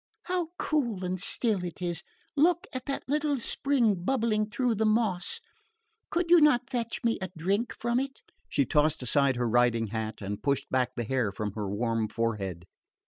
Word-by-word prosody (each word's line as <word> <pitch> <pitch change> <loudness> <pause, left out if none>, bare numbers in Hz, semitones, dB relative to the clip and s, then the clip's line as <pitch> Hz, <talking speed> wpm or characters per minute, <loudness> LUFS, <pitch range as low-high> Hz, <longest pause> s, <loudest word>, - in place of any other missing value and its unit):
"How 360 -2 -1
cool 235 - 0
and 180 +1 -2
still 200 0 +1
it 175 -2 -6
is! 175 -2 -2 0.3
Look 345 +5 +3
at 255 -1 -5
that 275 - -2
little 295 0 +1
spring 235 -7 +1
bubbling 220 -2 +1
through 245 +2 +1
the 220 +1 0
moss. 215 - 0 0.7
Could 340 0 0
you 350 -2 +8
not 270 -4 +4
fetch 235 -3 -2
me 230 -1 +1
a 185 - -3
drink 200 +8 0
from 235 +1 +1
it?" 270 0 -5 0.3
She 140 - +2
tossed 150 +1 +2
aside 140 +1 +3
her 120 0 0
riding 115 0 +3
hat 110 0 -4
and 100 +1 -4
pushed 140 +2 0
back 130 -1 +1
the 120 - -2
hair 120 -3 0
from 105 +1 -3
her 105 -1 -4
warm 115 +1 0
forehead. 100 -7 -2
185 Hz, 180 wpm, -29 LUFS, -, 0.7 s, you